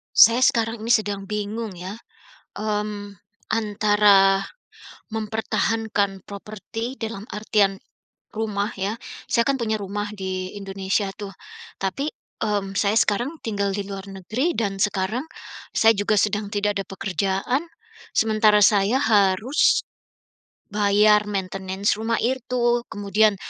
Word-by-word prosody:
Saya 230 +2 +8
sekarang 230 -2 +2
ini 220 - -6
sedang 200 -2 -2
bingung 210 0 -3
ya, 180 +2 -6 0.7
mmm, 210 -1 -3 0.3
antara, 205 -2 +4 0.7
mempertahankan 220 -2 -1
properti 215 +4 -6
dalam 225 -3 -5
artian, 205 -1 +1 0.6
rumah 210 -1 -2
ya, 200 +4 -3 0.3
saya 235 -1 +3
kan 275 -1 +2
punya 220 -1 0
rumah 205 +1 -4
di 185 0 -4
Indonesia 195 +1 -1
tuh, 205 -1 -7 0.5
tapi, 235 +10 -1 0.3
mmm, 205 -2 -1
saya 210 +1 +2
sekarang 240 +10 +1
tinggal 200 -3 0
di 200 - -3
luar 195 -1 -6
negeri, 215 - -2
dan 195 -3 -1
sekarang 210 +7 0 0.5
saya 225 0 +5
juga 205 +1 +1
sedang 210 0 +1
tidak 205 -1 0
ada - - -8
pekerjaan. 195 - -1 0.5
Sementara 215 -1 +4
saya 205 +3 +4
harus 215 +3 +3 0.9
bayar 210 +1 +4
maintenance 195 0 -1
rumah 225 +1 0
itu. 240 -1 +1
Kemudian, 210 0 +2
210 Hz, 115 wpm, -23 LUFS, 195-225 Hz, 0.9 s, Saya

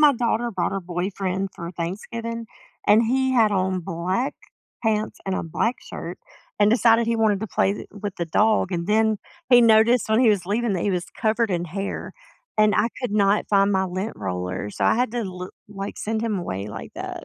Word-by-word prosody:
my 295 -2 +7
daughter 240 -1 0
brought 200 - -1
her 195 - -2
boyfriend 185 +2 -2
for 170 0 -6
Thanksgiving, 225 +7 -5 0.4
and 215 +3 +6
he 260 +2 +1
had 225 -4 +4
on 185 -1 0
black 180 +10 -2 0.5
pants 215 -1 0
and 190 - 0
a - - -1
black 225 +9 -1
shirt, 170 +2 -7 0.4
and 205 0 +5
decided 230 0 +4
he 230 0 +1
wanted 210 -3 +2
to 220 - -3
play 195 - +1
the - - -7
with 205 -1 -6
the 170 - -1
dog, 210 +2 +2
and 170 0 -2
then 220 0 +2 0.3
he 245 -1 +8
noticed 225 +1 +5
when 220 +3 +3
he 240 - +5
was 190 -4 +2
leaving 220 +1 0
that 175 - -1
he 205 - +1
was 180 0 -1
covered 225 0 +1
in 175 -2 0
hair, 195 +4 -5 0.5
and 215 -2 +5
I 230 - +3
could 250 -4 -2
not 205 0 +2
find 200 0 +4
my 190 0 +2
lint 185 +4 -3
roller, 90 0 -3
so - - -2
I - - +4
had 245 -1 +1
to, 240 -1 -1
li 185 0 -6 0.2
like, 195 -1 -6
send 220 +1 -2
him 215 -4 -1
away 100 - -4
like - - -8
that. - - -6
205 Hz, 210 wpm, -23 LUFS, 185-225 Hz, 0.5 s, he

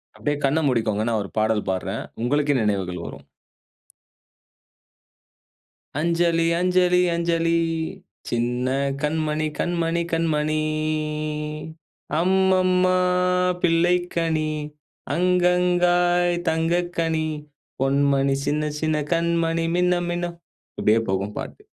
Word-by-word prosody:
அப்பிடியே 145 -1 -2
கண்ண 140 +4 +2
மூடிக்கோங்க. 110 -4 0
நான் 110 -2 0
ஒரு 100 - -9
பாடல் 110 -1 +1
பாடுறேன். 95 - -3 0.2
உங்களுக்கே 145 +2 +1
நினைவுகள் 95 -5 -1
வரும். - - -10 2.7
அஞ்சலி, 170 0 +2
அஞ்சலி, 180 0 +3
அஞ்சலி, 170 0 +1 0.7
சின்ன 120 +1 -1 0.3
கண்மணி, 155 0 -1
கண்மணி, 170 -1 0
கண்மணி. 155 -2 +1 1.6
அம்மம்மா! 185 0 +3 0.7
பிள்ளைக்கனி, 165 -2 +1 0.6
அங்கங்காய் 180 0 +2
தங்கக் 170 +2 0
கனி. 160 -1 0 0.5
பொன்மணி, 140 0 +2
சின்ன 150 +1 0
சின்ன 155 0 0 0.2
கண்மணி 165 0 0
மின்ன 180 0 +2
மின்ன 175 0 -1 0.5
இப்பிடியே 110 +2 +3
போகும் 100 +2 -2
பாட்டு. - - -7
165 Hz, 85 wpm, -23 LUFS, 140-175 Hz, 2.7 s, அஞ்சலி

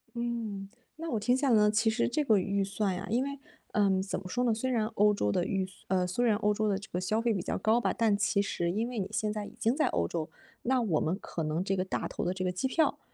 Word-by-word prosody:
嗯， 230 -5 -3 0.3
那 330 +1 -5
我 225 - 0
听 245 +4 +2
下 275 -1 +1
来 230 - +5
呢， 210 0 +5
其 220 +1 +3
实 220 +2 +1
这 295 +5 0
个 220 -6 +4
预 200 +1 0
算 195 -1 -1
呀， 190 +3 -5
因 240 +4 +2
为， 280 0 -5 0.3
嗯， 195 -2 +3
怎 195 - -3
么 185 - -9
说 245 +6 -1
呢， 235 -2 +3
虽 245 +4 -2
然 230 -4 +1
欧 210 -1 +3
洲 105 - 0
的 175 - +1
预 190 -1 0 0.2
呃， 185 -1 +2
虽 185 +7 0
然 220 -3 +4
欧 210 0 +2
洲 215 +1 0
的 195 -2 +1
这 210 +2 -10
个 180 - -1
消 215 +4 0
费 230 -1 +2
比 190 - -1
较 - - -2
高 220 +4 +3
吧， - - 0
但 220 -3 +3
其 205 0 +2
实 175 -3 -1
因 225 +5 -1
为 240 -4 -4
你 190 - -1
现 215 -1 0
在 210 -1 -4
已 - - -11
经 230 0 +2
在 305 - +2
欧 85 -1 0
洲， 155 -2 -3 0.3
那 255 0 +2
我 180 -9 +1
们 175 +5 0
可 165 -5 -5
能 155 +3 -1
这 195 0 -1
个 185 - 0
大 190 - -3
头 - - -4
的 180 - 0
这 185 0 -4
个 180 - 0
机 185 +9 -1
票， 320 +5 +1
210 Hz, 310 characters per minute, -30 LUFS, 190-235 Hz, 0.3 s, 来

